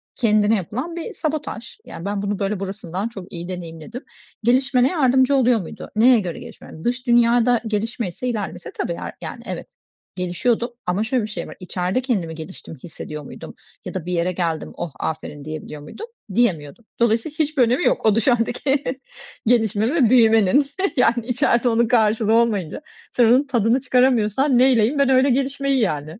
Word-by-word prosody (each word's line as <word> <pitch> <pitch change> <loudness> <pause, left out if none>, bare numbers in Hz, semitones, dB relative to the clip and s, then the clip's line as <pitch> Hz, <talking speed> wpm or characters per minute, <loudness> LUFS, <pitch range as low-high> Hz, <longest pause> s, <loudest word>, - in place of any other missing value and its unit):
kendine 215 -2 +3
yapılan 250 - -4
bir 335 - -6
sabotaj. 300 - -4
Yani, 170 - -9
ben 200 0 -2
bunu 205 0 -2
böyle 200 0 -1
burasından 195 0 -4
çok 195 -6 -10
iyi 175 +1 -6
deneyimledim. 180 - -7 0.4
Gelişmene 255 +1 +3
yardımcı 265 -3 +3
oluyor 245 -3 +3
muydu? 165 - -9
Neye 235 +1 +6
göre 175 -4 -5
gelişmeme? 160 - -12
Dış 245 +1 -2
dünyada 240 0 +4
gelişmeyse, 220 0 -3
ilerlemeyse 210 -4 -5
tabii - - -2
yar - - -6
yani - - -7
evet, - - -7 0.4
gelişiyordum 225 +7 -1 0.2
ama 190 +4 +1
şöyle 245 0 0
bir - - -3
şey - - -5
var, - - -10
içeride 180 +6 -2
kendimi 190 - -2
geliştiğimi 160 -3 -10
hissediyor 150 -3 -8
muydum - - -10 0.3
ya - - -6
da 175 -3 -4
bir 180 - -2
yere 175 +1 +1
geldim 165 -3 -3
"Oh, 170 -3 -4
aferin!" 150 -2 -5
diyebiliyor 155 -1 -7
muydum, 435 - -9 0.3
diyemiyordum. 185 -4 0
Dolayısıyla 235 +6 +1
hiçbir 300 -4 +2
önemi 250 +8 +1
yok. - - +1
O 215 -1 +4
dışarıdaki 245 +4 +1 0.6
gelişme 225 - +2
ve 250 -9 +4
büyümenin 225 +2 +4 0.3
yani 235 -1 +2
içeride 245 -1 +2
onun 230 0 +2
karşılığı 220 -1 +2
olmayınca 225 - +1 0.3
sen 240 - +3
onun 255 +5 +4
tadını 235 0 +2
çıkaramıyorsan 255 0 +2
neyleyeyim 255 +1 +3
ben 275 -1 +3
öyle 265 +1 +4
gelişmeyi, 275 +1 0
yani. 155 -2 -2
230 Hz, 165 wpm, -21 LUFS, 185-255 Hz, 0.6 s, Neye